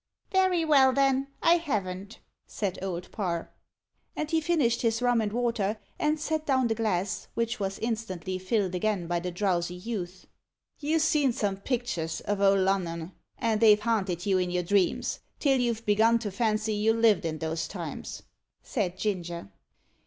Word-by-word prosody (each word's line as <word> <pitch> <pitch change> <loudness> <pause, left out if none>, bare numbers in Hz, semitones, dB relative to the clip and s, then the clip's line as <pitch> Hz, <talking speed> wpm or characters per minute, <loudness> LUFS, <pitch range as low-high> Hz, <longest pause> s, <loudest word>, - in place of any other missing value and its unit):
"Very 375 -3 +3
well, 270 -4 +5
then 270 0 +2 0.2
I 335 +1 +6
haven't," 200 - -4 0.3
said 200 -4 -3
Old 180 -2 -4
Parr. 175 -5 -3 0.6
And 305 +1 -3
he 325 -1 +2
finished 295 -8 +1
his 230 -1 +1
rum 245 -2 +2
and 210 -1 -1
water, 225 -3 0 0.2
and 305 +1 +1
set 310 0 -2
down 260 -2 +3
the 225 - +1
glass, 205 -4 -1
which 230 0 -1
was 195 -1 -2
instantly 195 -5 -3
filled 185 0 0
again 190 -1 0
by 175 0 -1
the 180 +1 -4
drowsy 180 -1 -1
youth. 180 -2 -5 0.5
"You've 310 +2 +1
seen 300 -4 +3
some 200 -3 -1
picters 200 -8 -2
o' 205 - +2
Old 195 -1 +4
Lunnon, 180 -3 -1 0.3
and 225 -1 0
they've 210 -2 +7
haanted 200 -5 -1
you 195 -2 +3
in 180 -1 0
your 180 0 0
dreams, 190 0 +1 0.2
till 270 -3 +2
you've 235 -2 -1
begun 220 +3 +4
to 220 -3 -4
fancy 215 +1 0
you 215 +2 +2
lived 225 -4 +4
in 160 -1 -2
those 160 +1 -2
times," - - -6 0.4
said 185 -7 -2
Ginger. 175 - -3
210 Hz, 165 wpm, -28 LUFS, 185-240 Hz, 0.6 s, they've